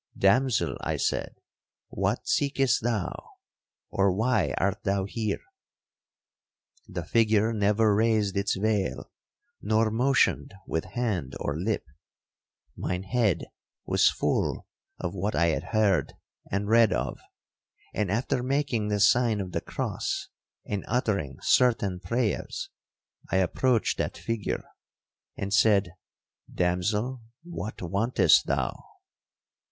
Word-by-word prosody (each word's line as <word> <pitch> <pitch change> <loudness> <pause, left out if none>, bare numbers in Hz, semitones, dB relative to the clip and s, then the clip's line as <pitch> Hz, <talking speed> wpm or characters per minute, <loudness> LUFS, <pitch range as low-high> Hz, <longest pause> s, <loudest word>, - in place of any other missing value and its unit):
'Damsel,' 120 +4 +2
I - - -2
said, - - -1 0.5
'what - - -1
seekest 135 -2 +2
thou?—or 100 -2 -3
why 110 +1 +1
art 100 +2 0
thou 100 -1 0
here?' 105 0 -3 1.4
The 90 -3 -5
figure 110 +2 +3
never 105 +1 +3
raised 110 -2 +2
its 100 +1 0
veil, 100 -8 -1 0.5
nor 110 +1 +2
motioned 125 -3 +2
with 80 - -2
hand 95 - -2
or 75 - -2
lip. 95 +5 -1 0.9
Mine 90 +1 -3
head 105 -2 +1 0.4
was - - +4
full - - -1 0.3
of 85 - -3
what 100 +2 -2
I 85 0 +3
had 80 - -1
heard 100 - +1 0.4
and 100 +1 -1
read 115 0 +5
of; 60 +2 -2 0.7
and 105 -3 -1
after 120 +4 0
making 130 -4 0
the 105 -1 0
sign 110 +2 +4
of 95 -2 -4
the - - -2
cross, - - -3 0.4
and 100 -2 -3
uttering 100 - -1
certain 105 -7 +3
prayers, 110 +4 -2 0.6
I - - -1
approached 115 +6 +1
that - - -2
figure, 115 -3 -3 0.7
and 100 0 -3
said, 100 -3 +4 0.6
'Damsel, 105 +8 0 0.2
what 170 - -6
wantest 100 +8 +3
thou?' - - -1
105 Hz, 115 wpm, -27 LUFS, 95-115 Hz, 1.4 s, read